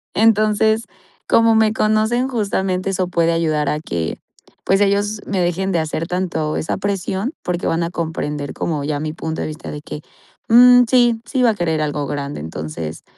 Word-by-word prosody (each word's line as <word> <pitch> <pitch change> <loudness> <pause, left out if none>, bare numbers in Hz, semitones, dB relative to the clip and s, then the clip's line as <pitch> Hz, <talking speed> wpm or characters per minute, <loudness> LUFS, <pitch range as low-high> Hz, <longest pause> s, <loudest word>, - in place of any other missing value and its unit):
entonces, 220 0 +3 0.4
como 230 0 +4
me 220 -1 +3
conocen, 220 +4 +1
justamente 195 -5 -1
eso 185 -1 -1
puede 170 -2 +1
ayudar 155 -3 0
a 150 - -1
que, 85 - -4 0.5
pues 195 - +3
ellos 205 +1 +1
me 195 - -1
dejen 180 +2 0
de 175 - +1
hacer 160 +1 -2
tanto 175 -4 -2
esa 155 - -2
presión 195 - -2
porque 180 0 -2
van 165 - 0
a 170 - -2
comprender 150 -4 -4
como 155 -4 -2
ya 145 0 -2
mi 155 +1 -3
punto 160 0 -4
de - - -2
vista 155 +2 -7
de 150 - -7
que: 150 0 -8 0.5
"Mm, 245 +2 +8
sí, 240 -3 +3
sí 255 +2 -1
va 235 - +5
a - - -4
querer 160 -5 -1
algo 145 -1 -2
grande", 140 - -4
entonces, 80 0 -6
180 Hz, 180 wpm, -19 LUFS, 155-215 Hz, 0.5 s, Mm